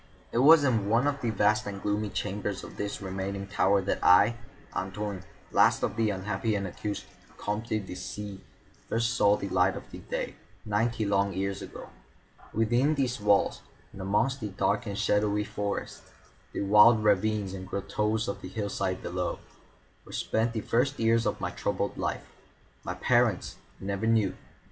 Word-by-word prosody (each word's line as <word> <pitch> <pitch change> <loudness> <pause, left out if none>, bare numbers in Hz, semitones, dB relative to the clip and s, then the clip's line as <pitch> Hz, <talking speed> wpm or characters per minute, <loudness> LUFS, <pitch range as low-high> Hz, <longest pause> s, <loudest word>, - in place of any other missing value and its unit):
It 115 - +1
was 150 +3 +8
in 115 -7 +1
one 115 +4 +3
of 145 -1 0
the 120 - 0
vast 105 0 +2
and 100 -1 -5
gloomy 105 +1 -1
chambers 100 -1 -3
of - - -10
this 100 0 -4
remaining 95 +1 -4
tower 100 0 +2
that 100 - -2
I, 100 +6 +6 0.4
Antoine, 95 0 -4 0.3
last - - +4
of 100 - 0
the 110 -1 +2
unhappy 105 +2 -1
and 100 -1 -1
accursed 100 +3 -5 0.3
Comtes 105 +3 -3 0.2
de - - -7
C——, 95 +2 -6 0.5
first 115 0 +1
saw 105 -4 +4
the 100 - -4
light 95 +1 +3
of - - -7 0.3
day, - - -2 0.3
ninety 110 +1 0
long 100 -1 +1
years 95 +1 -2
ago. - - -9 0.6
Within 120 +7 +2
these 130 -4 0
walls, 105 -1 +3 0.3
and 100 - -8
amongst 105 +8 +1
the 105 - -2
dark 100 +3 0
and 100 -1 -4
shadowy 105 0 +2
forests, 100 -1 -4 0.5
the - - -3
wild 105 +3 +6
ravines 105 -1 +2
and 95 -1 -7
grottoes 105 +3 -1
of 100 - -4
the 90 - -7
hillside 95 -2 -2
below, 90 0 -2 0.7
were - - -14
spent 115 +1 0
the 110 - -2
first 130 +7 +1
years 115 0 +2
of - - -1
my - - -2
troubled - - -2
life. - - -3 0.6
My - - -4
parents - - +1 0.2
I - - -12
never 100 +2 -1
knew. 110 -4 +3
105 Hz, 170 wpm, -28 LUFS, 100-115 Hz, 0.7 s, was